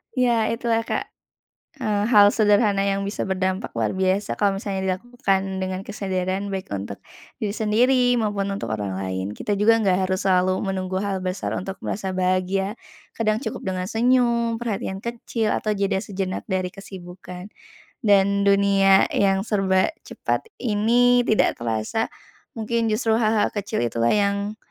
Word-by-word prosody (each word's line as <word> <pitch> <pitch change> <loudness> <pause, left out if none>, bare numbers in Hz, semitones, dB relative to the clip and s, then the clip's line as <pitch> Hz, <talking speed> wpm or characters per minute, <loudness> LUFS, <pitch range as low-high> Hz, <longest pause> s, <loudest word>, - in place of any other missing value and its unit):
Ya, 240 -3 +2
itulah, 230 -1 0
Kak. - - -2 0.7
Eee, 215 -6 -1
hal 205 -3 +7
sederhana 205 -2 +3
yang 195 0 0
bisa 200 +2 -3
berdampak 190 +1 -2
luar - - 0
biasa, 190 +2 0
kalau 200 -1 +1
misalnya 190 -2 -1
dilakukan 195 -3 -2
dengan 185 0 -3
kesadaran, 190 -1 -3
baik 190 - -5
untuk 100 0 -5 0.4
diri 210 - 0
sendiri, 245 +4 +2
maupun 205 -4 0
untuk 195 - -5
orang 105 -3 -3
lain. 95 +1 -3
Kita 205 -1 -2
juga 225 +2 +4
nggak 190 -2 +2
harus 185 0 -1
selalu 185 -1 +3 0.2
menunggu 185 0 -2
hal 200 -2 -1
besar 185 0 -3
untuk 195 +1 -5
merasa 190 -2 -3
bahagia. 185 +3 0 0.4
Kadang 220 +1 +1
cukup - - -5
dengan 185 0 -3
senyum, 235 0 +2
perhatian 205 -4 -4
kecil, 230 -1 -2
atau 215 0 0
jeda 195 -1 0
sejenak 190 -1 -4
dari 185 -2 -1
kesibukan. 180 -1 -10 0.5
Dan 200 -2 +3
dunia 200 -1 +4
yang 195 0 +2
serba 195 +5 +1
cepat 450 - -3
ini, 245 +2 +3
tidak 220 -3 +2
terasa. 115 - -1 0.5
Mungkin 225 +1 0
justru 220 +1 +1
hal-hal 220 -1 +2
kecil 200 - -2
itulah, 115 0 0
yang 200 +1 0
200 Hz, 145 wpm, -23 LUFS, 190-220 Hz, 0.7 s, hal